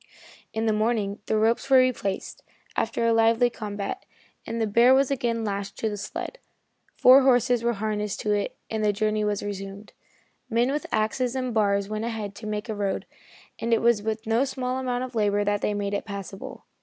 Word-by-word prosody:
In 220 0 -2
the 220 - +2
morning 215 -2 0
the 220 - +1
ropes 230 +5 +1
were 265 - +7
replaced, 250 -7 0 0.3
after 230 +1 0
a 230 - +4
lively 225 +2 +4
combat, 210 - -5 0.4
and 230 - -3
the 225 - +2
bear 235 +5 +5
was 275 0 +2
again 235 -4 0
lashed 200 -1 -4
to 220 - -1
the 210 - -4
sled. 355 - -6 0.6
Four 260 +2 +8
horses 245 -2 +3
were 235 0 +2
harnessed 210 -1 -2
to 210 - +1
it 205 -1 -2
and 220 -1 -2
the 210 -1 +3
journey 215 +1 0
was 205 -1 -1
resumed. 200 0 -7 0.6
Men 240 +2 +2
with 295 +1 -2
axes 235 +4 0
and 255 -2 -2
bars 200 -2 +2
went 215 +1 -3
ahead 220 -4 -4
to 215 - -7
make 210 +1 -3
a 220 - -2
road, 200 -2 -2 0.5
and 230 0 +2
it - - -1
was 235 -3 +4
with 220 +1 -3
no 225 +3 +2
small 260 -1 -2
amount 250 -1 -1
of 255 -1 -6
labor 205 -2 +2
that 205 0 0
they 210 - 0
made 205 0 -2
it 200 - -2
passable. 200 -2 -8
220 Hz, 200 wpm, -26 LUFS, 205-240 Hz, 0.6 s, Four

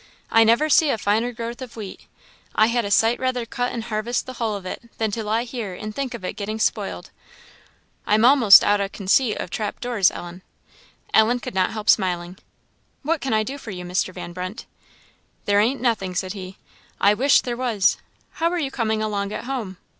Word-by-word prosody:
I 225 - +6
never 230 +7 +3
see 310 0 +4
a 250 - +1
finer 215 +4 0
growth 235 +1 -6
of 250 -3 -8
wheat. 210 -4 -9 0.5
I 215 - +5
had 240 -2 +1
a - - -3
sight 225 +3 +3
rather 255 -2 -1
cut 245 +1 -2
and 230 - -4
harvest 230 +2 -2
the 255 - -7
hull 225 -3 -2
of 195 -2 -8
it 235 +5 -7
than 220 -2 -1
to 225 +2 -3
lie 220 +2 0
here 230 -6 -5
and 215 +3 -6
think 265 0 -3
of 200 -6 -8
it - - -3
getting 215 +1 -4
spoiled. 220 - -2 1.0
I'm 215 +2 +4
a'most 245 -6 +8
out 205 0 +2
o' 195 - -2
conceit 210 +4 +1
o' - - -2
trap 205 +3 -4
doors, 235 -7 +2
Ellen." 175 +1 -9 0.7
Ellen 225 +3 +4
could - - -7
not 185 -1 +2
help 215 -1 -6
smiling. 180 -1 +1 0.6
"What 315 +2 0
can 270 - -2
I 215 0 +2
do 275 +5 -6
for 235 - -10
you, 180 -3 -6
Mr. 180 +1 -1
Van 175 -1 -8
Brunt?" 185 +4 -6 0.8
"There 205 0 +3
ain't 240 +6 +1
nothing," 215 -7 0
said 185 +1 -2
he; 190 -2 -9 0.4
"I 200 - +5
wish 270 +6 +4
there 240 -1 -3
was. 235 -6 +1 0.3
How 335 +1 0
are 355 - -2
you 285 -5 -2
coming 220 -3 -1
along 200 -2 -2
at - - -5
home?" 235 -8 -4
220 Hz, 205 wpm, -22 LUFS, 200-245 Hz, 1.0 s, a'most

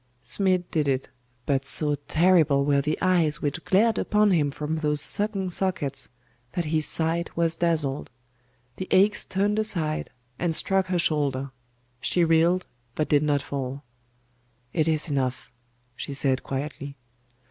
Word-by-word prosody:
Smid 185 +7 +1
did 155 -4 0
it: 135 -1 -1 0.4
but 135 -2 0
so 145 +2 +1
terrible 155 -1 +2
were 140 -1 +2
the 150 +2 -2
eyes 175 -5 +2
which 150 +4 -3
glared 220 +4 +2
upon 210 -1 +2
him 155 -5 +2
from 150 +3 -4
those 150 -1 +1
sunken 200 +3 +2
sockets, 170 -7 -2 0.4
that 175 - -2
his 155 0 +1
sight 165 +1 -1
was 165 -1 +2
dazzled. 155 -5 -1 0.7
The 185 - -6
axe 200 +2 +3
turned 205 +2 0
aside, 170 -8 -1 0.3
and 170 -2 +2
struck 190 +2 +1
her 185 -1 0
shoulder. 140 -5 +1 0.5
She 170 +7 +1
reeled, 165 +3 +3 0.3
but 155 - -1
did 145 -1 +4
not 145 -2 0
fall. 135 0 -5 0.9
'It 160 -2 +1
is 155 -1 0
enough,' 130 -2 -2 0.4
she 140 - -5
said 135 -1 +1
quietly. 140 +1 -6
155 Hz, 145 wpm, -25 LUFS, 140-180 Hz, 0.9 s, did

